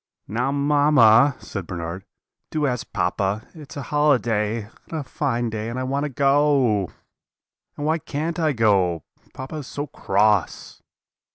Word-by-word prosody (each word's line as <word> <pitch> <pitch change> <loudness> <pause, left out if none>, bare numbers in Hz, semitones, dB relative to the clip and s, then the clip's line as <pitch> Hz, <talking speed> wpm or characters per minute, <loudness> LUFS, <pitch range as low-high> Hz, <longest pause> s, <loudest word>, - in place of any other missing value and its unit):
"'Now, 120 +6 -1
mamma,' 140 -3 +5
said 95 -5 -7
Bernard, 85 +1 -5 0.4
'do 155 -1 -1
ask 125 -4 -3
papa; 100 +3 -1
it's 150 -4 -11
a 140 - -4
holiday, 120 -7 +2 0.3
and - - -11
a - - -4
fine 120 -4 -2
day, 110 +1 -4
and 120 - -5
I 130 - -2
want 140 +3 -1
to - - -3
go. 135 - +2 0.9
And 145 - -3
why 160 +2 +1
can't 160 +4 -4
I 155 -2 +2
go? 95 - +2 0.3
Papa 135 +4 -6
is 145 - -7
so 145 - -4
cross.' 105 - 0
130 Hz, 150 wpm, -23 LUFS, 105-145 Hz, 0.9 s, mamma